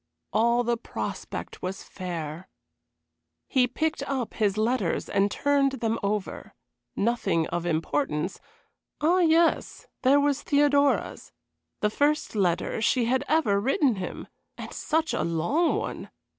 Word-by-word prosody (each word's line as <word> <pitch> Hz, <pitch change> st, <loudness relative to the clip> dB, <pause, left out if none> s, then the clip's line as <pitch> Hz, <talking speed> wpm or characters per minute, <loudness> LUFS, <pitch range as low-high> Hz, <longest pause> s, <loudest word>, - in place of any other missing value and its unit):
All 235 Hz, +3 st, +3 dB
the 235 Hz, 0 st, 0 dB
prospect 230 Hz, -, -6 dB
was 185 Hz, +1 st, -4 dB
fair. 170 Hz, -2 st, -6 dB, 1.0 s
He 255 Hz, -3 st, +3 dB
picked 315 Hz, +5 st, -2 dB
up 260 Hz, -4 st, -3 dB
his 210 Hz, -2 st, 0 dB
letters 220 Hz, -4 st, 0 dB
and 200 Hz, +1 st, +2 dB
turned 280 Hz, +3 st, +2 dB
them 230 Hz, -3 st, -1 dB
over. 200 Hz, 0 st, -3 dB, 0.4 s
Nothing 200 Hz, -7 st, +1 dB
of 175 Hz, 0 st, -2 dB
importance. 165 Hz, -, -1 dB, 0.6 s
Ah, 340 Hz, +5 st, +3 dB
yes! 330 Hz, -1 st, +2 dB, 0.2 s
there 275 Hz, +3 st, +5 dB
was 285 Hz, 0 st, +1 dB
Theodora's. 285 Hz, -1 st, +2 dB, 0.5 s
The 210 Hz, -, +2 dB
first 295 Hz, +5 st, +1 dB
letter 190 Hz, 0 st, 0 dB
she 235 Hz, +2 st, +2 dB
had 260 Hz, +3 st, +1 dB
ever 215 Hz, -11 st, +2 dB
written 270 Hz, -, +2 dB
him, 180 Hz, -1 st, -6 dB, 0.3 s
and -, -, -8 dB
such 315 Hz, 0 st, 0 dB
a -, -, 0 dB
long 170 Hz, -, +1 dB
one! -, -, -4 dB
235 Hz, 130 wpm, -26 LUFS, 195-285 Hz, 1.0 s, there